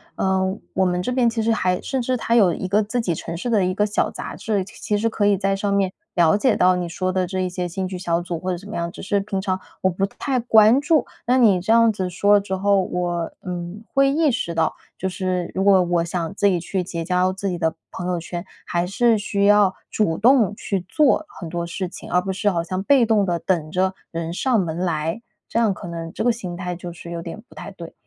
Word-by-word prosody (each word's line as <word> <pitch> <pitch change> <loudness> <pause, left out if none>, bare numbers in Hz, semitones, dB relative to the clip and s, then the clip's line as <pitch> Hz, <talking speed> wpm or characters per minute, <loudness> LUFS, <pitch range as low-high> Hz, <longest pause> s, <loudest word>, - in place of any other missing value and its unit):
呃， 190 +1 0 0.2
我 190 - +2
们 180 0 0
这 250 - -2
边 250 -2 +3
其 225 0 -2
实 230 - +2
还 185 -5 +1
甚 265 -2 -2
至 255 +1 0
它 230 - -1
有 200 -7 +5
一 185 - -4
个 200 +3 +3
自 215 +4 -2
己 185 -7 -1
城 165 +1 -5
市 185 - -4
的 215 -4 +3
一 185 - 0
个 210 - +2
小 210 +1 0
杂 - - -7
志， 205 -3 -1
其 - - -14
其 210 - 0
实 220 +2 +1
可 215 -2 0
以 205 -1 +3
在 195 0 0
上 200 +1 -1
面 195 -2 +1 0.2
了 170 -2 +4
解 230 +3 +2
到 185 0 +4
你 180 -1 -3
说 185 +2 -2
的 185 -1 0
这 190 +1 -3
一 185 - -1
些 180 0 -3
兴 185 +2 -3
趣 185 - -6
小 170 -2 0
组 175 -1 -4
或 185 - -4
者 180 - -2
怎 195 +4 -12
么 210 - -6
样， 170 0 -2
只 - - -10
是 200 +1 +1
平 195 -1 -3
常 190 -1 -1 0.2
我 190 - +3
不 190 +3 0
太 260 +5 -2
关 225 +2 +5
注。 305 -2 +2 0.2
那 250 +1 +4
你 210 -8 +5
这 190 - 0
样 230 0 +6
子， 185 -3 -2
说 200 +4 +3
了 205 - +6
之 190 -1 -3
后， 200 +1 +3
我， 175 -2 -2
嗯， 180 +3 -5
会 275 0 +4
意 305 0 +3
识 170 -9 -3
到， 160 -1 +1 0.2
就 190 - -2
是 185 -1 -2
如 190 - 0
果 195 -2 +6
我 175 -1 +1
想 170 +1 -3
自 205 - +3
己 185 -3 +2
去 180 +2 -2
结 170 -2 -5
交 180 +1 +2
自 195 +1 -3
己 180 - -2
的 160 0 0 0.2
朋 180 - -5
友 180 -1 -1
圈， 170 +1 -6 0.2
还 175 0 0
是 230 +4 +2
需 200 -1 0
要 205 -2 +5
主 180 -7 0
动 230 -3 +4
去 195 -3 -3
做 305 0 +3
很 175 - -9
多 170 +1 -3
事 185 +2 -4
情， - - -10
而 180 - +4
不 190 +1 -3
是 200 +2 +1
好 170 -4 0
像 185 +2 -3
被 265 +2 +5
动 220 -2 +3
地 175 -2 -1
等 165 -5 -1
着 185 +2 +1 0.2
人 165 0 -4
上 245 +5 +1
门 165 -4 -2
来。 165 +2 -1 0.3
这 230 - 0
样 220 -4 +3
可 - - -10
能 165 -1 -6
这 - - -3
个 240 - +4
心 190 -7 -5
态 180 -1 -4
就 175 0 -7
是 170 0 -10
有 170 -1 -4
点 170 +6 -7
不 - - -16
太 205 - -8
对， 170 -4 -10
190 Hz, 280 characters per minute, -22 LUFS, 175-210 Hz, 0.3 s, 样